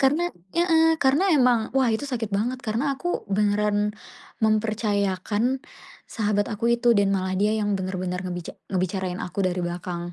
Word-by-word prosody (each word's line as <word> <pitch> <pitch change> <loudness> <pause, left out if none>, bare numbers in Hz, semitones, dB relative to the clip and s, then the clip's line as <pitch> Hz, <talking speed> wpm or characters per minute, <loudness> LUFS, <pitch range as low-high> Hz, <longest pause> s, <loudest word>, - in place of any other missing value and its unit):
karena 300 +6 +3 0.3
heeh. 325 -2 +4
Karena 300 +8 +3
emang, 245 -5 +3
wah, 260 -3 +4
itu 220 - -1
sakit 230 -5 -2
banget. 245 +6 -1
Karena 240 +6 0
aku 350 +4 -3
beneran 210 +1 +1 0.5
mempercayakan 215 +2 0 0.5
sahabat 205 -2 0
aku 230 +3 +1
itu, 235 0 +4
dan 200 -1 +3
malah 185 -1 -1
dia 205 +3 +2
yang 205 -1 0
benar-benar 185 -1 -3
ngebica 175 -1 -6 0.2
ngebicarain 185 0 -1
aku 180 +2 -4
dari 180 0 -1
belakang. 175 0 -5
210 Hz, 150 wpm, -24 LUFS, 190-250 Hz, 0.5 s, heeh